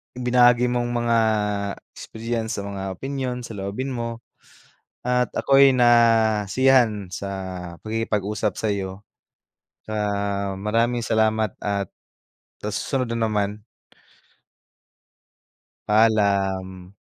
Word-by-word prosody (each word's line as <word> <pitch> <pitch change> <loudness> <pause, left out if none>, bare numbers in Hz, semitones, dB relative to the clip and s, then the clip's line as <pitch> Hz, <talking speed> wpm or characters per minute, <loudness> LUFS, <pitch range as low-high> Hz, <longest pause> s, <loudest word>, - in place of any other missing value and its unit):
ibinahagi 125 0 +4
mong 120 0 -1
mga 120 -1 +1 0.8
experience 115 -1 -4
sa 100 - -5
mga 95 -1 -5
opinyon, 135 -2 -3
saloobin 110 +6 -4
mo, 115 -1 -4 0.9
at 125 0 +1
ako'y 135 0 +5
nasiyahan 115 -1 +3
sa 100 +1 -5 0.5
pakikipag 110 -2 -2
usap 105 -1 -2
sayo. 100 -2 -3 0.8
Ah, 100 -2 -2
maraming 115 +3 0
salamat 110 -1 +1
at 100 -1 -1 0.8
sa 105 - -3
susunod 130 +3 -2
na 115 -1 0
naman. 105 -1 -2 2.2
Paalam. 100 -3 +1
110 Hz, 90 wpm, -23 LUFS, 100-120 Hz, 2.2 s, ako'y